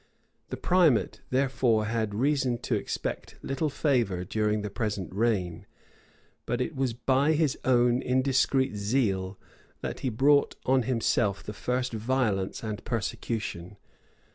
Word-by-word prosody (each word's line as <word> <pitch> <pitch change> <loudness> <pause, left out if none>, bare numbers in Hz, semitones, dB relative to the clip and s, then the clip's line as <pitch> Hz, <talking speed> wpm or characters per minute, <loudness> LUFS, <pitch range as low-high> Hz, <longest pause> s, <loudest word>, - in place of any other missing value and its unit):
The - - -4
primate, 175 -9 +2
therefore, 130 -4 +2
had 110 -2 -1
reason 130 0 +1
to - - -1
expect 105 - -3
little 135 +3 -1
favor 120 - 0
during 105 +1 0
the 105 - -4
present 100 -4 -3
reign; 100 -6 -1 0.8
but 120 +1 -1
it 135 +5 -2
was 130 -3 0
by 135 +5 +2
his 155 -3 +1
own 120 -1 +3
indiscreet 130 -1 +2
zeal, 100 -3 0 0.4
that - - -4
he 130 - -1
brought 140 +5 +3
on 130 0 +3
himself 115 -4 0
the 105 - -6
first 125 +2 -2
violence 110 -5 -1
and 110 0 -4
persecution. 105 -5 -4
120 Hz, 130 wpm, -28 LUFS, 105-130 Hz, 0.8 s, own